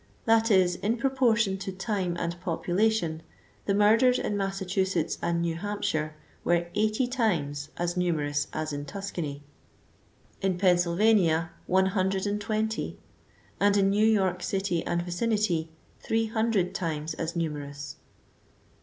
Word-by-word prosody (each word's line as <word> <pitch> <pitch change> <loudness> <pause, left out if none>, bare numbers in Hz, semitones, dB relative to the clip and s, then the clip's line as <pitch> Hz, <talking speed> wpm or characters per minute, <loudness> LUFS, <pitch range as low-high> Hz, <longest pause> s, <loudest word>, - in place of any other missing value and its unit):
That 225 0 +4
is, 185 -3 +4
in 225 +4 0
proportion 235 -6 +2
to 195 - -4
time 190 -2 -2
and 170 +1 -3
population, 175 -1 0 0.5
the 200 - +2
murders 225 +5 +5
in 205 - -2
Massachusetts 190 -3 -1
and 170 0 0
New 170 -1 0
Hampshire 160 -6 -2 0.3
were 170 0 +2
80 215 +4 +1
times 160 - -1
as 175 0 -1
numerous 150 -5 0
as 155 -1 -3
in 145 0 -4
Tuscany; 170 -7 -5 1.0
in 190 -2 0
Pennsylvania, 175 -2 +3 0.2
120; 205 +3 0 0.6
and 205 0 +4
in 195 0 +3
New 210 +2 +3
York 190 -5 +2
city 190 -4 -1
and 175 0 0
vicinity, 175 -3 0 0.3
300 225 -4 0
times 160 -3 -3
as 165 +2 -4
numerous. 145 -3 -4
190 Hz, 120 wpm, -28 LUFS, 170-210 Hz, 1.0 s, murders